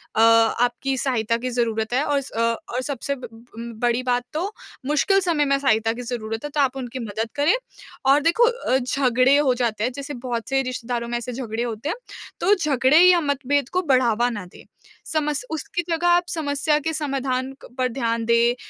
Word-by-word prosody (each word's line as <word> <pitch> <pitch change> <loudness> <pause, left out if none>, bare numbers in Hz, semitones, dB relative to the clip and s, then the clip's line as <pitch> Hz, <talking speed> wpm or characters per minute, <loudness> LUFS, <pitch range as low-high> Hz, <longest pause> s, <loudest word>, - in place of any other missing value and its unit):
अ, 220 - +3
आपकी 235 +3 +3
सहायता 230 -3 0
की 255 +2 -4
ज़रूरत 225 -2 -1
है 265 +3 +2
और 285 -1 +1
स - - -10
अ, - - -4 0.3
और 250 - -1
सबसे 280 0 -3
ब 255 -2 -9 0.3
उम, 235 0 -7
बड़ी 240 +1 +1
बात 245 -1 0
तो 360 +6 -2 0.4
मुश्किल 300 +7 +3
समय 330 -5 +1
में 275 0 +2
सहायता 225 -4 +2
की 240 - -7
ज़रूरत 225 -2 -4
है 295 - -4
तो 295 - +1
आप 270 -1 +1
उनकी 255 0 -5
मदद 225 0 -3
करें 290 +6 +3 0.5
और 275 +2 +5
देखो 340 +10 +4
अ, 475 - 0
झगड़े 255 +1 +3
हो 280 -3 +3
जाते 230 -3 -1
हैं 250 - -1
जैसे 285 +1 -6
बहुत 240 -3 -4
से 270 0 +2
रिश्तेदारों 245 -2 -3
में 240 - -1
ऐसे 240 +1 -5
झगड़े 235 -2 -3
होते 235 +4 -4
हैं, - - -1 0.4
तो 400 +4 +4
झगड़े 280 -4 +3
या 360 0 +7
मतभेद 285 -1 0
को 365 - 0
बढ़ावा 245 -6 +2
ना 205 -6 -5
दें। 180 - -15 0.4
समस 300 +4 -1
उसकी 320 +2 -3
जगह 335 +1 +1
आप 350 0 +4
समस्या 295 -1 0
के 320 +2 -3
समाधान 270 -3 -2
क - - -10
पर 255 -1 +2
ध्यान 230 -2 -1
दें, 235 +1 +3
255 Hz, 200 wpm, -23 LUFS, 235-290 Hz, 0.5 s, या